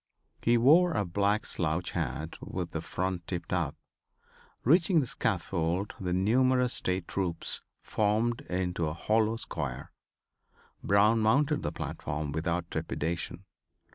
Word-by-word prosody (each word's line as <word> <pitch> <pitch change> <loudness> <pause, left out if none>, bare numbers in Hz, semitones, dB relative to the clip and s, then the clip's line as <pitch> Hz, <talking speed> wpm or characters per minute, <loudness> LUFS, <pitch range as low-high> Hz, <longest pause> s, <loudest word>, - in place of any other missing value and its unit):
He 120 +1 +4
wore 160 +9 +6
a 105 - 0
black 100 +4 +1
slouch 85 +1 -1
hat 80 +4 -3
with 90 -2 -4
the 80 - -3
front 90 0 -3
tipped 85 -2 -4
up. 80 -5 0 0.9
Reaching 165 - +4
the 140 - +1
scaffold 90 -3 -1
the 90 -3 -2
numerous 125 +6 +3
State 90 -1 -1
troops 90 -4 -2 0.2
formed 110 +3 +1
into 90 -2 -1
a 75 - -3
hollow 110 +4 +2
square. 70 - -5 0.9
Brown 105 +3 +4
mounted 145 +7 +3
the - - -2
platform 75 -1 -4
without 85 +3 -2
trepidation. 85 +4 -3
95 Hz, 125 wpm, -30 LUFS, 85-115 Hz, 0.9 s, wore